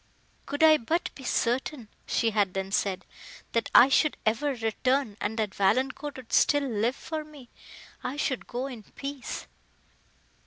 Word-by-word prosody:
"Could 290 +2 -1
I 310 -1 +8
but 320 +9 -1
be 270 - -12
certain," 250 0 -1 0.2
she 230 -1 +1
had 205 -3 +1
then 195 0 -3
said, 195 -2 0 0.5
"that 230 - 0
I 250 - +10
should 300 +2 +3
ever 260 +6 +1
return, 235 +1 0
and 220 +2 -2
that 215 -3 -1
Valancourt 260 +8 0
would 255 -3 -11
still 290 -1 +4
live 230 +2 0
for 315 +1 -5
me—I 285 -1 -11
should 260 -4 -2
go 245 +2 -3
in 250 -5 -7
peace!" 275 +5 -6
250 Hz, 150 wpm, -28 LUFS, 220-285 Hz, 0.5 s, I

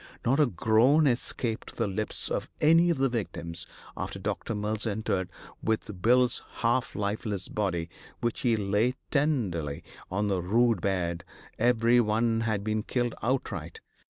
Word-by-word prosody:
Not 135 +5 +3
a 150 - +5
groan 120 - +4
escaped 120 -2 -1
the 115 - 0
lips 105 +2 -2
of - - -2
any 165 +3 +5
of 170 - +1
the 135 +1 +3
victims 85 -8 -4 0.3
after - - -4
Doc. - - -4
Mills 105 0 -1
entered 100 -4 -1 0.3
with 105 -4 -2
Bill's 125 +2 +4 0.2
half 120 +2 +1
lifeless 105 -1 -2
body, 90 -6 -1 0.3
which 120 -1 -1
he 120 -2 +2
lay 105 +4 +1 0.2
tenderly 105 - 0 0.3
on 105 +3 0
the 95 -3 0
rude 115 +2 +2
bed; 85 -3 -1 0.4
every 120 +1 +4
one 115 0 +2
had 110 -3 -1
been 110 0 0
killed 120 +1 -1
outright. 110 - -2
110 Hz, 145 wpm, -28 LUFS, 100-120 Hz, 0.4 s, a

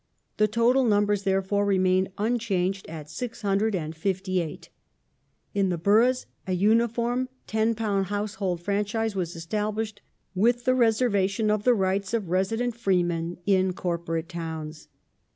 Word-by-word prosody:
The 215 - +4
total 235 +5 +3
numbers 205 -3 +2
therefore 195 +1 +1
remained 190 -1 +2
unchanged 200 -4 -1
at 155 -2 -7
658. 185 -3 -2 0.8
In 195 -2 +1
the 175 - -1
boroughs 225 +9 +3 0.2
a 185 - 0
uniform 235 +5 +1 0.2
£10 220 -3 0
household 205 -3 -2
franchise 210 +3 -1
was 175 -3 -3
established, 210 +5 -3 0.3
with 235 +6 +2
the 255 - +4
reservation 220 -3 +2
of 210 -1 -1
the 250 -1 +5
rights 195 +2 0
of 200 -7 -3
resident 225 +6 0
freemen 175 -6 0
in 190 -2 +3
corporate 170 -2 -3
towns. 160 -3 -6
200 Hz, 115 wpm, -26 LUFS, 185-220 Hz, 0.8 s, the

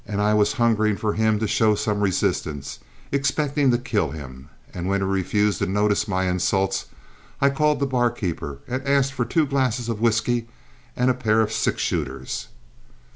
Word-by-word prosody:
I 105 +1 +1
was 105 -1 +3
hungering 110 -4 +2
for 105 -2 -1
him 110 -1 +2
to 110 +1 -1
show 110 +1 +3
some 105 0 -1
resistance, 80 -7 -1 0.3
expecting 140 0 +1
to 120 - +3
kill 120 -3 -1
him, 70 -2 -9 0.2
and 90 0 -4
when 100 0 +1
he - - 0
refused 100 +2 +1
to 100 - 0
notice 105 +2 +1
my 95 -2 0
insults, 95 +2 0 0.5
I 140 0 +4
called 150 +1 +1
the 140 - +1
barkeeper 120 - -1
and 130 +2 -2
asked 140 -1 +2
for 125 -2 -1
two 155 +6 +2
glasses 130 -4 0
of 110 -2 -3
whiskey 115 +1 +1 0.5
and 125 +1 +2
a - - +1
pair 110 -3 +1
of 110 -1 0
six - - 0
shooters. 70 -5 -3
110 Hz, 175 wpm, -23 LUFS, 95-125 Hz, 0.5 s, I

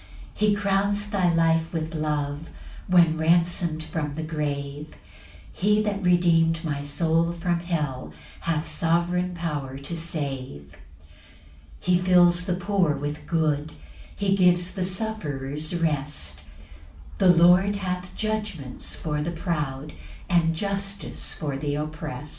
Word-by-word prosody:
4 215 - +1
He 205 - +3
crowns 205 +1 0
thy 185 -4 +2
life 165 0 +2
with 160 -1 -3
love, 150 -1 -2 0.4
When 170 -3 +4
ransom'd 165 0 +2
from 150 -2 -3
the 160 - -3
grave; 145 -1 -4 0.6
He 210 +3 +2
that 205 -1 -1
redeem'd 170 -2 +3
my 145 -3 -2
soul 165 +3 +1
from 170 0 -1
hell 150 -7 -3 0.3
Hath 165 -1 -1
sovereign 175 +3 0
power 145 -6 -3
to 140 +5 -6
save. 135 - -5
5 - - -18 1.0
He 180 0 +3
fills 180 -1 +5
the 180 - +1
poor 185 -4 +1
with 145 +2 -5
good; 155 -2 0 0.4
He 195 -1 +1
gives 180 -1 +3
the 190 - -2
sufferers 155 -7 -3
rest; 145 - -2 0.7
The 190 - +5
Lord 180 +4 +6
hath 180 -2 -4
judgments 210 -12 -3
for 150 -2 -2
the 155 - -2
proud, 150 -5 -3 0.3
And 165 -2 +2
justice 200 +2 -3
for 145 -3 -3
th' 145 0 -2
opprest. 150 -1 -5
165 Hz, 130 wpm, -25 LUFS, 150-180 Hz, 1.0 s, Lord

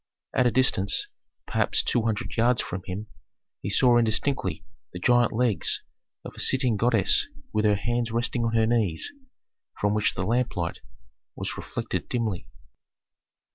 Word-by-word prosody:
At 125 - +3
a - - +2
distance, 100 -5 +2 0.4
perhaps - - +1
two 120 - +1
hundred 110 +1 -3
yards 120 +1 +3
from 90 - -2
him, 100 +3 -5 0.6
he - - -4
saw 125 -2 +4
indistinctly 110 - 0 0.3
the 90 - -6
gigantic 120 +3 +3
legs 120 -5 +1 0.4
of - - -8
a - - -9
sitting 130 -4 +3
goddess 115 -2 +4 0.3
with 110 0 +1
her 105 -1 +4
hands 120 +3 -1
resting 120 +1 -1
on 115 0 -1
her 110 -1 +3
knees, 110 -8 0 0.7
from 105 0 +1
which 105 0 +1
the - - -2
lamplight 115 -8 -1 0.6
was - - -4
reflected - - -5
dimly. 110 -7 -2
115 Hz, 145 wpm, -26 LUFS, 105-120 Hz, 0.7 s, saw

